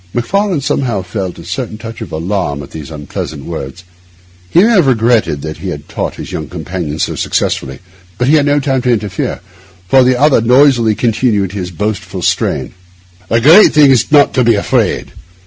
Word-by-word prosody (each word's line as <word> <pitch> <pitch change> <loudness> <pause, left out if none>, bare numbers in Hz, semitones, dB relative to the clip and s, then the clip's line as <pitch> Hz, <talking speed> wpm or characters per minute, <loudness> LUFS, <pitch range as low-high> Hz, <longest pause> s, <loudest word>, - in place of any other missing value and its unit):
Macfarlane 185 - 0
somehow 120 -8 -1
felt 95 0 -5
a 85 - -10
certain 110 +5 -5
touch 115 0 -9
of - - -7
alarm 80 -3 -3
at - - -13
these 75 -2 -8
unpleasant 75 -1 -7
words. 80 +1 -7 0.7
He 175 - +4
may 230 - +4
have 185 -10 +4
regretted 110 - +1
that 80 0 -6
he 90 +4 -6
had 75 -5 -7
taught - - -4
his - - -8
young 75 - -5
companion 85 -3 -5
so - - -1
successfully, 65 -1 -2 0.4
but 125 - 0
he 145 - +3
had 150 -2 +3
no 145 0 +2
time 135 -2 -1
to 125 0 +1
interfere, 105 -4 -2 0.5
for 130 +8 +5
the 125 0 +2
other 145 -4 +4
noisily 120 -2 +4
continued 105 -4 0
in 100 - -5
this 90 -1 -4
boastful 105 +4 -4
strain:— - - -1 0.6
'The 115 +1 +2
great 165 - +7
thing 150 -2 +6
is 130 0 +2
not 145 -2 +5
to 130 - +2
be 115 -1 +3
afraid. 100 - -1
110 Hz, 190 wpm, -13 LUFS, 90-130 Hz, 0.7 s, great